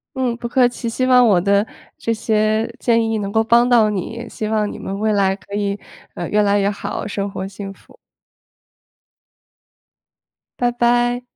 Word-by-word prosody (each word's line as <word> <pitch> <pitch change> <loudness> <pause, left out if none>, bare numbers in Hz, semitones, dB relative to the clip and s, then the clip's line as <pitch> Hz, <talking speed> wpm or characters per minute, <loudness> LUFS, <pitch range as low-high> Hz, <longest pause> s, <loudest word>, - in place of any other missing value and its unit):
嗯， 255 -3 -1
不 235 0 -5
客 245 +1 +3
气。 240 -1 -5
希 255 +3 -1
望 250 -1 +6
我 200 -6 +4
的 200 +3 +2 0.3
这 230 - -1
些 215 0 +1
建 230 -1 +2
议 225 -1 0
能 200 -1 -4
够 220 - +2
帮 235 +2 +4
到 230 -3 +5
你。 220 +4 -4
希 215 - -4
望 215 -1 0
你 - - -7
们 195 - -5
未 215 0 +1
来 195 -2 +2
可 200 0 -10
以， 200 0 -2 0.4
呃， 175 - -4
越 210 - +2
来 205 0 +2
越 200 0 +2
好， 205 0 -5
生 200 -1 -3
活 190 0 -5
幸 195 0 -8
福。 - - -22 2.6
拜 245 -1 +2
拜。 240 0 +1
215 Hz, 190 characters per minute, -19 LUFS, 200-235 Hz, 2.6 s, 望